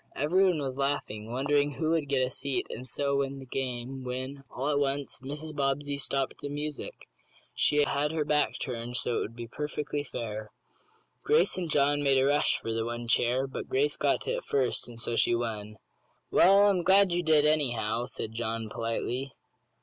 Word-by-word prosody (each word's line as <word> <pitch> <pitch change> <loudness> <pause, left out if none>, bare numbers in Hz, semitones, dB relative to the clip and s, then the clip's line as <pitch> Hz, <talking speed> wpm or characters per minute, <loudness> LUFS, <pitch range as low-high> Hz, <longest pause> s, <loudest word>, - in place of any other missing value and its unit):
Everyone 180 +3 +3
was 135 -2 -3
laughing, 115 -6 -2
wondering 145 +3 +1
who 160 +2 -1
would 160 -4 0
get 130 -2 +3
a 130 - -5
seat 140 +1 -2
and 125 +2 -7
so 140 +2 0
win 140 0 -1
the 135 - -9
game, 130 0 -4
when, 130 +2 -5
all 135 +3 -3
at 145 -1 +2
once, 140 0 -1
Mrs. 150 +4 -6
Bobbsey 140 0 0
stopped 135 -1 -2
the 145 - -4
music. 150 +1 -5 0.5
She 150 0 +3
had 145 +1 0
her 160 -2 -1
back 150 0 +1
turned 120 -1 -4
so 120 - 0
it - - +1
would 115 - -4
be 120 0 -6
perfectly 150 +3 -3
fair. 110 -5 -5 0.7
Grace 455 +2 +3
and 175 -3 -3
John 145 0 +3
made 140 -2 +3
a 130 - +4
rush 145 +1 +3
for 115 - -4
the 115 0 0
one 120 +1 -4
chair, 120 +3 +2
but 135 - -6
Grace 425 +2 +1
got - - +1
to - - -3
it - - -5
first, 130 -3 0
and 120 -1 -11
so 120 0 -2
she 120 - +3
won. 110 -3 -4 0.5
"Well, 195 +3 +6
I'm 195 -3 +3
glad 190 +1 +5
you 175 +1 +1
did, 155 -3 +4
anyhow," 120 -6 +1
said 110 - -5
John, 115 -1 -3
politely. 120 +3 -3
135 Hz, 190 wpm, -29 LUFS, 120-150 Hz, 0.7 s, Well